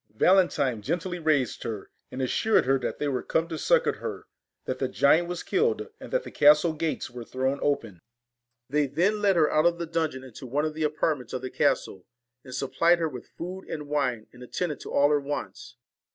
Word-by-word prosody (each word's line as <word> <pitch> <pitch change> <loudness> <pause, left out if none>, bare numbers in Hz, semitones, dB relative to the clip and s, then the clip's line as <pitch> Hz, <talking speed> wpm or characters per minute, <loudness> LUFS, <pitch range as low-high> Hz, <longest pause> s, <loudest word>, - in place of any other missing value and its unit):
Valentine 145 - +3
gently 175 - -2
raised 155 -6 +1
her, 110 -4 -6 0.2
and 130 - -4
assured 215 - +2
her 135 +1 +3
that - - -3
they 145 - -2
were 130 -3 -1
come 160 +1 0
to 165 - -5
succour - - +2
her, - - -6 0.4
that - - -3
the - - 0
giant 160 +5 +3
was 175 0 -4
killed, 435 +1 0
and - - -10
that - - +1
the - - -9
castle 150 +3 +5
gates 155 -5 -3
were 120 -1 -7
thrown 130 +3 -2
open. 115 -10 -1 0.7
They 145 +1 +1
47 140 - -19
VALEN 185 +6 +3
then 210 - -5
led 200 -2 +3
her 155 -3 +3
out 155 +2 +4
of 170 0 +1
the 170 - -3
dungeon 160 -5 -2
into 130 0 -10
one 145 +5 0
of 155 - -2
the 160 - -6
TINE 155 - +4
AND 150 - -10
apartments 135 -7 -1
of 130 - -4
the 130 - -4
castle, 95 -2 0 0.4
and 130 -1 -8
supplied 165 +6 +3
her 165 -1 0
with 125 -4 -9
ORSON 185 +3 -6
fo^ - - -9
and 155 - -3
w 145 +1 -5
i 140 -3 +2
nC) 110 -1 -18
an( 125 - -15
j - - -10
attended 150 +4 -3
to - - -8
all 145 +1 +4
her 145 -1 +3
wants. 130 -3 -6
150 Hz, 240 wpm, -27 LUFS, 130-170 Hz, 0.7 s, castle